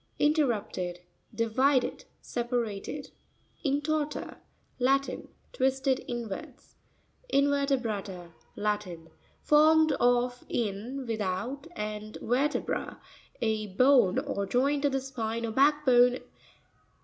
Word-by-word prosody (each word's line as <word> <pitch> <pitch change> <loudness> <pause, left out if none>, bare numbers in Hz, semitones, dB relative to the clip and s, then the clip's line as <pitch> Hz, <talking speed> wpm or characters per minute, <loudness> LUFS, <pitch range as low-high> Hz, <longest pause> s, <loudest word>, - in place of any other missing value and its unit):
InrERRU'pTED.— 225 - 0 0.3
Divided, 255 +4 +1 0.2
separated. 240 +2 -3 0.5
Intor'ta.—Latin. 285 -2 -2 0.3
'Twisted 265 - +1
inwards. 240 +4 -6 0.6
Invertesra'TA.—Latin, 210 - -1 0.3
Formed 315 +1 +5
of 245 0 +2
in, 235 +5 -3
without, 225 +5 -3
and 215 0 -5
vertebra, 275 +6 -1 0.4
a 215 -1 0
bone 250 -6 +5
or 200 0 -2
joint 280 +5 +1
of 285 - +3
the 270 - 0
spine 230 -3 -3
or 225 - -3
hack 295 +5 +3
bone. 245 -1 +5
245 Hz, 80 wpm, -29 LUFS, 215-280 Hz, 0.6 s, Formed